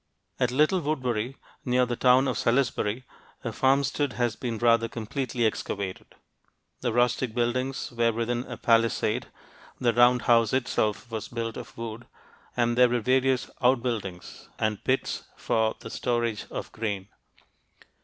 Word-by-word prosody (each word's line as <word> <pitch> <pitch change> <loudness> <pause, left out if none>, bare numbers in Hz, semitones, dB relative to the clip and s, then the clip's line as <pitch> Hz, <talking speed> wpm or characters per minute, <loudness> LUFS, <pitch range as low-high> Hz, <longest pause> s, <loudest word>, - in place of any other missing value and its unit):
At 125 -2 +2
Little 155 +8 +3
Woodbury, 130 -5 -2 0.3
near 125 0 +2
the 120 0 -2
town 130 +2 +4
of 130 - 0
Salisbury, 120 -2 +1 0.4
a - - -2
farmstead 135 0 +1
has 120 0 0
been 120 -2 -3
rather 115 0 +3
completely 120 +2 -2
excavated. 100 -3 -3 0.6
The 120 - -1
rustic 120 0 +1
buildings 130 +3 -1
were 120 -1 +2
within 120 +2 -1
a 125 - -7
palisade, 115 -1 +2 0.5
the 120 -2 +2
round 120 +1 +5
house 115 -2 +4
itself 120 -3 0
was 110 -2 -4
built 115 -1 -4
of - - -9
wood, 115 0 -6 0.5
and 120 -1 +2
there 125 0 +6
were 120 0 +1
various 130 +2 +2
outbuildings 120 -8 -1
and 110 -2 -1
pits 130 +1 0 0.2
for 110 -1 +1
the 115 - -8
storage 120 -4 -1
of - - -6
grain. 105 -3 -4
120 Hz, 140 wpm, -27 LUFS, 115-125 Hz, 0.6 s, there